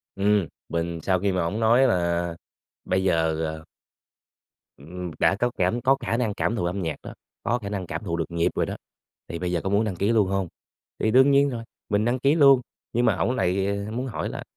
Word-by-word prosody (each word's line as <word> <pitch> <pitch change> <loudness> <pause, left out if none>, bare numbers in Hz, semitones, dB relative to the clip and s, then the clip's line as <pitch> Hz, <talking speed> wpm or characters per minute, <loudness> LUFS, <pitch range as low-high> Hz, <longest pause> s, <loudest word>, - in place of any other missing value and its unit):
Ừm, 100 -2 +2 0.2
mình 85 0 -2
sau 95 -1 +2
khi 100 +2 +1
mà 90 -1 0
ổng 100 +6 -2
nói 120 +4 +5
là 85 -2 0 0.5
bây 95 0 0
giờ, 80 -3 +1
ờ 80 0 -5 1.1
ừm, 90 +4 -7
đã - - +4
có 120 +4 0
cảm 95 +7 +1
có 135 +2 +4
khả 115 -2 -1
năng 115 -4 0
cảm 110 - -1
thụ 110 - -2
âm 90 +3 -2
nhạc 80 -4 -2
đó, - - -8 0.3
có 120 - +1
khả 100 -3 -6
năng 95 -3 -4
cảm 80 +4 -5
thụ 85 -4 -2
được 80 - -3
nhịp 85 0 +1
rồi - - +1
đó, - - -5 0.5
thì 85 - -5
bây 90 0 -2
giờ 85 -2 0
có 95 - -1
muốn 100 +2 +2
đăng 105 -4 -2
ký 100 +5 +1
luôn 110 -4 +3
hông? 95 -1 -1 0.5
Thì 110 - +1
đương 130 +4 +6
nhiên 140 +1 +4
rồi, 120 -3 -5 0.3
mình 105 +1 +1
đăng 120 +2 +1
ký 140 +4 +3
luôn 140 -5 +6 0.3
nhưng 120 +1 +2
mà - - +3
ổng - - 0
lại 95 0 +1 0.2
muốn 125 +4 -3
hỏi 120 - -3
là - - -6
100 Hz, 230 wpm, -25 LUFS, 85-115 Hz, 1.1 s, đương